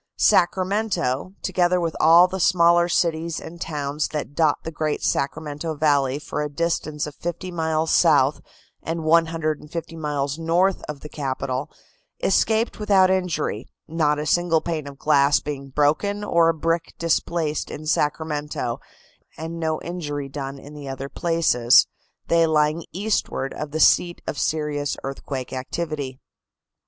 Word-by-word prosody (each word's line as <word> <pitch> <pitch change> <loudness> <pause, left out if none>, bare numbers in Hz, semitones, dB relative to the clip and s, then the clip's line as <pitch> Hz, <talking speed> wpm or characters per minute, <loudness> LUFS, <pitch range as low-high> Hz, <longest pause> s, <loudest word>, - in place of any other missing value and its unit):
Sacramento, 185 -4 +1
together 180 -1 +2
with 165 -2 -2
all 170 +3 +7
the 190 +1 -5
smaller 170 -1 +4
cities 165 -1 0
and 170 +1 -10
towns 145 -1 -2
that 150 -2 -5
dot 150 -1 +2
the 160 - -5
great 155 -1 -2
Sacramento 150 +2 -2
Valley 140 -3 +2
for 150 0 -4
a 150 - -2
distance 155 -1 -2
fifty 175 +2 -4
miles 160 -1 0
south 145 -4 +4 0.4
and 165 0 -3
150 165 0 0
miles 145 -1 -2
north 175 +4 +2
of 150 -2 -6
the - - -8
capital, 135 -2 -3 0.5
escaped 220 +1 +1
without 195 -3 +4
injury, 180 - -1 0.2
not 155 -2 +1
a 150 - -3
single 175 0 +2
pane 155 -3 -4
of 140 -1 -9
glass 140 -1 +3
being 140 -2 -6
broken 155 +9 +1
or 170 -4 +3
a - - +3
brick 165 +1 -1
displaced 165 -2 -1
in 155 - -7
Sacramento 150 -4 -1 0.6
and 165 +1 -6
no 160 -1 -1
injury 145 -5 -4
done 135 0 -6
in 145 +2 -12
the 145 -2 -9
other 135 +1 -5
places, 160 -9 +4 0.4
they 165 -1 +4
lying 155 +1 +2
eastward 195 -8 -2
of 150 - -5
the 155 +2 -3
seat 175 +2 +4
of 145 - -4
serious 150 -2 -1
earthquake 135 -1 -5
activity. 135 0 -4
155 Hz, 140 wpm, -23 LUFS, 145-170 Hz, 0.6 s, all